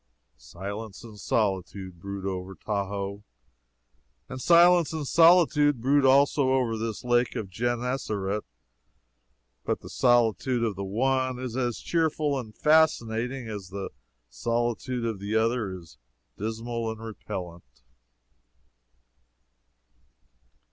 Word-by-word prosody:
Silence 100 - -7
and 110 -3 -12
solitude 95 -2 -2
brood 100 +1 -6
over 95 0 -4
Tahoe; 100 0 -3 1.0
and 130 -1 -7
silence 175 +1 +6
and 155 -3 -3
solitude 165 -5 +5
brood 140 +4 +3
also 135 0 +4
over 125 -4 +1
this 110 -1 -4
lake 120 -1 +1
of 95 -3 -5
Genessaret. 115 -3 -2 1.2
But - - -2
the - - -10
solitude 120 0 +2
of 110 -4 -1
the 100 - -4
one 130 +5 0
is 125 -2 -5
as 120 -3 -1
cheerful 155 -4 0
and 110 -4 -10
fascinating 125 -5 +2
as 100 -4 -6
the 100 0 -5 0.4
solitude 120 - -2
of 110 -4 -2
the 100 +2 -3
other 110 -2 +1
is 85 -3 -11 0.4
dismal 115 +2 -3
and 110 -1 -6
repellant. 90 - -8
115 Hz, 110 wpm, -27 LUFS, 100-130 Hz, 1.2 s, silence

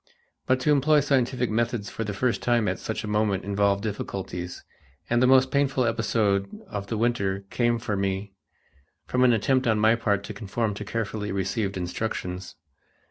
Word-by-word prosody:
But 130 0 +3
to 150 - +2
employ 150 +1 +4
scientific 130 -4 +1
methods 115 -2 -1
for 115 - -3
the 105 -2 -4
first 125 +3 0
time 120 -3 +2
at - - -1
such 110 - -4
a - - -4
moment 105 -2 +1
involved 100 0 +1
difficulties, 95 -4 -5 0.5
and 120 0 +3
the 125 - +5
most 130 0 +5
painful 135 -2 +2
episode 110 -4 +1 0.2
of 100 -1 -5
the 115 - -2
winter 100 -4 0
came 120 -1 +2
for 110 -3 -3
me 95 0 -2 0.7
from 125 0 +1
an 125 - +6
attempt 130 +3 +2
on 110 -1 +3
my 110 +1 +5
part 100 -4 0
to 105 - -6
conform 105 +1 -2
to 105 +1 -6
carefully 105 -1 -3
received 95 +1 -1
instructions. 90 0 -4
110 Hz, 175 wpm, -26 LUFS, 100-120 Hz, 0.7 s, an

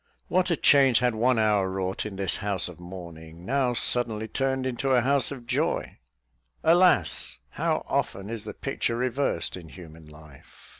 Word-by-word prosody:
What 185 +1 +1
a 170 - +1
change 135 -4 +5
had 125 -1 +1
one 120 +3 +2
hour 105 -3 +2
wrought 95 +2 -3
in 100 - -8
this 95 0 0
house 100 -3 0
of 90 -1 -11
mourning, 85 -2 -11
now 130 0 0
suddenly 115 -2 +1
turned 130 +3 -1
into 130 +1 -2
a 125 - +4
house 140 +2 +3
of 130 -4 -8
joy! - - -1 0.7
Alas! 170 - +3
how - - -1
often 95 +1 -2
is 115 -1 -5
the 105 -2 -7
picture 120 -3 -2
reversed 130 +3 -1
in 85 -3 -11
human 80 -3 -13
life! 75 -2 -17
110 Hz, 165 wpm, -26 LUFS, 95-130 Hz, 0.7 s, change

